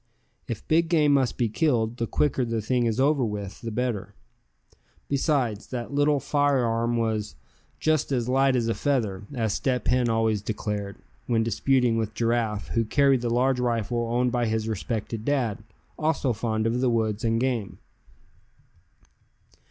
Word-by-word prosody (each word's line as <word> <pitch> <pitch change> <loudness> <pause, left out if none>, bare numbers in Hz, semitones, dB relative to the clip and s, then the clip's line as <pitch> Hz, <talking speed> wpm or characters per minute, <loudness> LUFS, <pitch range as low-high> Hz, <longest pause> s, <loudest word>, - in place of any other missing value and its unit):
If - - -6
big 165 +1 +3
game 150 -4 +4
must 135 -3 +1
be 120 - +1
killed, 115 -1 0
the 115 - -2
quicker 135 0 +1
the 115 -1 -1
thing 120 +2 +1
is 115 +2 -1
over 140 0 +3
with 105 -3 -4
the 115 - -4
better. 115 -3 -3 0.9
Besides, 135 -7 0
that 125 +1 -5
little 145 0 +3
fire 145 -1 +1
arm 115 +1 0
was 110 -8 -1 0.4
"just 155 -2 +1
as 120 -3 0
light 135 +1 +3
as 120 -2 +1
a 115 - +1
feather," 110 -10 -1
as 110 -4 0
Step 125 -2 -1
Hen 125 -1 +2
always 110 -2 +1
declared, 105 -2 -4 0.3
when 115 -2 +2
disputing 125 0 +2
with 110 -1 -2
Giraffe, 115 -2 0
who 115 - +1
carried 135 +2 +3
the 120 - -1
large 125 +2 +2
rifle 120 -1 -1
owned 125 +1 +1
by 120 -1 0
his 110 0 -1
respected 110 +1 -3
dad, 120 -6 -1 0.4
also 155 -5 +1
fond 110 0 -1
of 120 +2 0
the 130 - +3
woods 110 -2 0
and 115 0 +1
game. 120 -5 -1
120 Hz, 160 wpm, -26 LUFS, 110-130 Hz, 0.9 s, game